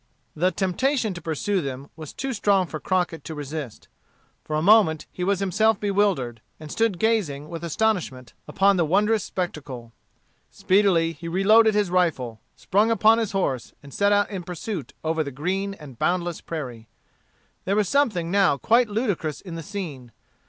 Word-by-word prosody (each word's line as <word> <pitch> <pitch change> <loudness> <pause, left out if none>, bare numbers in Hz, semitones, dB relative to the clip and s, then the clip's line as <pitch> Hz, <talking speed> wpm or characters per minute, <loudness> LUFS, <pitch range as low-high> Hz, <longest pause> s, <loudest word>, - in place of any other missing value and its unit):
The 180 +4 +2
temptation 215 +5 0
to 175 - -8
pursue 170 +5 -1
them 135 -1 -6
was 155 -2 -9
too 270 0 -4
strong 200 -3 +2
for 155 -2 -6
Crockett 180 -2 -1
to 160 - -6
resist. 145 -4 -6 0.6
For 155 - -4
a 155 - +1
moment 195 -6 +5
he 180 - -5
was 195 +1 +1
himself 205 +3 +2
bewildered, 195 - 0 0.2
and 155 -1 -9
stood 225 -5 +1
gazing 170 -9 0
with 165 -1 -7
astonishment 170 - -1
upon 195 0 +3
the 175 - +3
wondrous 205 +6 +2
spectacle. 140 -10 -5 0.6
Speedily 185 -4 +2
he 170 +1 -9
reloaded 215 +5 +4
his 205 -4 +1
rifle, 145 -11 0
sprung 205 +4 +1
upon 225 0 +4
his 220 -3 -2
horse, 135 -11 -1
and 140 -2 -13
set 200 0 +2
out 205 +1 +2
in 195 -3 -4
pursuit 175 - -6
over 160 0 0
the 140 - -5
green 190 +8 -2
and 140 -9 -13
boundless 175 -2 -1
prairie. 125 -9 -7 0.8
There 195 - +1
was 210 -2 +2
something 200 -11 +1
now 195 -7 +3
quite 235 - +3
ludicrous 205 - -2
in 180 -4 -9
the 165 - -5
scene. 160 - -7
180 Hz, 165 wpm, -24 LUFS, 155-205 Hz, 0.8 s, moment